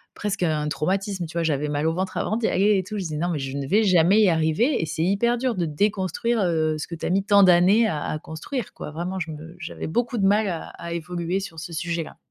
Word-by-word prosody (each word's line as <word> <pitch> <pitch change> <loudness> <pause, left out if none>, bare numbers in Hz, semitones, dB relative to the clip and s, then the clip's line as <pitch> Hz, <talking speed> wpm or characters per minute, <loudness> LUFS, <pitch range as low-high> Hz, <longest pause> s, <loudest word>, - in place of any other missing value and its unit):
presque 205 -2 -3
un 155 -3 0
traumatisme, 190 +3 -1
tu 165 +2 -7
vois? 170 - +1
J'avais 150 -2 0
mal 145 +2 0
au 160 - +1
ventre 185 +2 -3
avant 215 - 0
d'y 230 - 0
aller 205 +2 +3
et 185 - 0
tout. 210 +3 -6
Je 195 - -2
disais: 155 -3 -4
«Non, 175 +3 -1
mais 165 -4 -1
je 135 0 -4
ne 140 - -3
vais 210 +8 +3
jamais 185 +2 +4
y 205 - +5
arriver». 165 - +2
Et - - 0
c'est 160 +1 -2
hyper 220 +7 +2
dur 250 -1 -1
de 175 -3 0
déconstruire, 205 +7 0
heu, 160 -3 +1
ce 150 - -5
que 170 - -6
tu - - -6
as - - 0
mis 195 +2 +2
tant 200 -1 +5
d'années 190 +5 +5
à 150 -7 -2
à 155 - -3
construire 190 - -6
quoi. - - -7
Vraiment, 175 +4 -4
je 160 -2 -4
me 160 +3 -9
j'avais - - -6
beaucoup 240 +7 -1
de 195 - +2
mal 205 +1 +3
à 165 -2 -4
à 170 - -8
évoluer 170 +2 -2
sur 175 -4 -8
ce 170 +2 -7
sujet-là. 170 0 -4
175 Hz, 270 wpm, -24 LUFS, 160-200 Hz, -, y